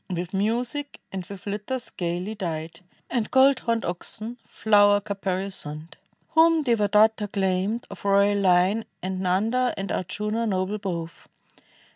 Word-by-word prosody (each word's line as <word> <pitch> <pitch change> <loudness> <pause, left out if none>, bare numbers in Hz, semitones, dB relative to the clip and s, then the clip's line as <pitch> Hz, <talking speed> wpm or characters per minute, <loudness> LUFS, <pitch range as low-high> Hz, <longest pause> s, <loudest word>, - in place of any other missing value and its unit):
With 180 0 -4
music, 240 +8 -1
and 190 -1 -4
with 200 -1 -10
litters 210 +5 -4
gayly 175 +4 -3
dight, 170 -4 -5 0.3
And 235 -4 -1
gold 270 +1 +5
homed 230 -2 -1
oxcd. 215 +7 -5
flower 205 -1 +4
caparisoned. 190 -6 -4 0.4
Whom 325 0 +4
Devadatta 215 -2 +3
claimed, 195 +4 0
of - - -10
royal 200 0 +3
hne. 185 +4 +3 0.2
And 185 0 -3
Xanda 220 +8 +1
and 195 0 -4
Ardjuna, 210 +5 -2
noble 190 +2 -1
both. 170 -5 -5
200 Hz, 125 wpm, -25 LUFS, 185-225 Hz, 0.4 s, gold